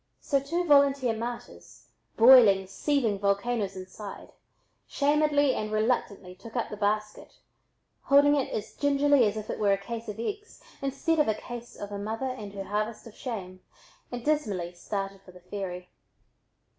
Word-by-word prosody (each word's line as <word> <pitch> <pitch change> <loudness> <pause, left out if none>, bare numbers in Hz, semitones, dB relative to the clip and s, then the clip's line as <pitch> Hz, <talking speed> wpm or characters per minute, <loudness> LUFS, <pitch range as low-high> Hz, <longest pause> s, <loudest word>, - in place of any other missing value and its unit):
So 280 - +1
two 335 +6 -2
volunteer 280 -5 +4
martyrs, 235 +2 -8 0.3
boiling, 225 -5 +7
seething 225 +1 0
volcanoes 200 0 0
inside, 190 +2 -9 0.6
shamedly 290 -1 +2
and 215 0 -3
reluctantly 215 -4 -1
took 225 +5 -13
up 235 - -2
the - - -4
basket, 210 +1 -2 0.7
holding 285 +1 +6
it 275 - -1
as 215 - -4
gingerly 285 -2 +3
as 205 +1 -2
if 215 0 -6
it - - -5
were 205 -2 +3
a - - +1
case 225 +3 -7
of 210 0 -6
eggs 415 - -5 0.2
instead 275 +4 0
of 300 - +3
a 215 - +1
case 240 +1 -9
of 205 0 -7
a 200 - -4
mother 225 +6 -3
and 210 -5 -8
her 195 -1 -5
harvest 215 +3 -3
of 230 - -11
shame, 185 -8 -6 0.5
and 245 -1 -6
dismally 210 - -1
started 195 +2 -5
for 185 - -16
the 180 - -14
ferry. 180 -1 -6
220 Hz, 160 wpm, -28 LUFS, 200-275 Hz, 0.7 s, boiling